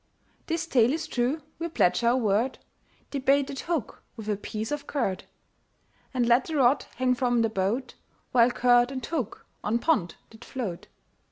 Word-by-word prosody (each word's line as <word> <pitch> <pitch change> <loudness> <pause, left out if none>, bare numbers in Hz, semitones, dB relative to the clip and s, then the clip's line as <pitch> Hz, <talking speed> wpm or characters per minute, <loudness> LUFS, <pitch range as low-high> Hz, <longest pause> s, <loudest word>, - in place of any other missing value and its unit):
This 330 0 -1
tale 255 -5 +3
is 320 0 -2
true 265 +1 -1 0.2
we 335 - -2
pledge 210 - +2
our 235 +2 +4
word, 225 +2 +1 0.5
They 280 - -2
baited 275 0 +2
hook 330 -9 -3
with 220 -2 -7
a 210 - +2
piece 215 +3 -5
of 295 -1 -3
curd, 195 -10 -2 0.9
And 250 -3 +1
let 240 +2 +4
the 320 - -4
rod 270 -1 +3
hang 255 0 +2
from 245 -2 +1
the 225 - +2
boat, 220 +6 -1 0.4
While 240 -1 +5
curd 245 0 +4
and 260 -3 -4
hook 260 -9 -4 0.2
on 215 +3 +1
pond 235 - +1 0.2
did 220 +1 -14
float. 210 -10 -5
245 Hz, 170 wpm, -27 LUFS, 225-275 Hz, 0.9 s, While